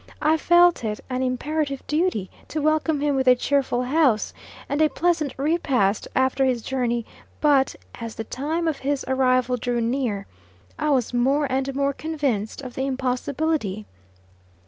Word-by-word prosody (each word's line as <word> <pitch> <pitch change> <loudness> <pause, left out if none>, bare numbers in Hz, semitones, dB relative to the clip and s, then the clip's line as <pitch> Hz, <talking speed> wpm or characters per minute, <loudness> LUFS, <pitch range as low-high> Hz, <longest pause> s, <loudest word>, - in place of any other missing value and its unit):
I 310 +1 +4
felt 345 -1 +4
it 210 -1 -2
an 255 0 -1
imperative 275 +2 -2
duty 300 - 0 0.2
to 310 - -3
welcome 310 0 +1
him 290 -1 +1
with 265 -1 0
a 250 - +8
cheerful 260 -1 0
house, 260 -4 +2 0.3
and 285 +2 -1
a 310 - +5
pleasant 320 -6 0
repast 270 - +1
after 260 +1 +2
his 250 -3 +1
journey; 240 -3 -1 0.3
but 280 -3 +3 0.2
as 230 -1 -7
the 225 - -4
time 310 +9 -2
of 310 -3 -1
his 280 0 -1
arrival 255 -1 +2
drew 245 0 -1
near, 230 -4 -1 0.5
I 305 - 0
was 255 -4 +1
more 270 +5 +2
and 265 +1 -1
more 280 0 +1
convinced 275 -8 -2
of 250 -2 -7
the 265 +1 -2
impossibility. 255 -4 -1
265 Hz, 155 wpm, -24 LUFS, 245-300 Hz, 0.5 s, a